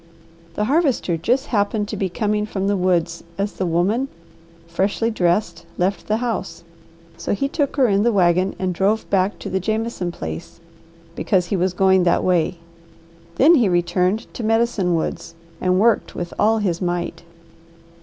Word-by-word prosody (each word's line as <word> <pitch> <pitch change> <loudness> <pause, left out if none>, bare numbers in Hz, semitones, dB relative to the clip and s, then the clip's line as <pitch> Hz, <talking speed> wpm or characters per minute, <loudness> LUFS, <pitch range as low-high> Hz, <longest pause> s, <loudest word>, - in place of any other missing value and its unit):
The 210 - 0
Harvester 270 - +1
just 245 - 0
happened 205 0 +1
to 220 - -3
be 195 -2 -1
coming 210 +2 -1
from 195 -2 -3
the 200 +1 +1
woods 175 -3 0
as 200 +1 -2
the 185 - -2
woman 195 +10 +1 0.6
freshly 195 +7 0
dressed 175 -3 0
left 190 +2 -1
the 215 - +1
house, 205 -8 -3 0.5
so 170 - -2
he 275 - -1
took 285 -1 -1
her 270 -3 +4
in 200 -2 +2
the 235 +2 +3
wagon 185 -1 +2
and 185 -1 -1
drove 200 +5 0
back 195 0 +1
to - - -8
the 190 - -1
Jameson 215 -2 -2
place, 80 - -7 0.6
because 185 -4 +1
he 185 - -2
was 185 0 0
going 190 0 +4
that 175 - +2
way. 175 -1 +1 0.8
Then 300 +6 +6
he 240 - +4
returned 180 +5 +1
to 235 - -6
Medicine 225 -5 +1
Woods 165 +1 -4 0.3
and 185 0 +2
worked 230 +2 +2
with 175 -1 -5
all 220 +2 +4
his 185 -5 -1
might. 175 -1 -2
195 Hz, 165 wpm, -21 LUFS, 175-220 Hz, 0.8 s, Then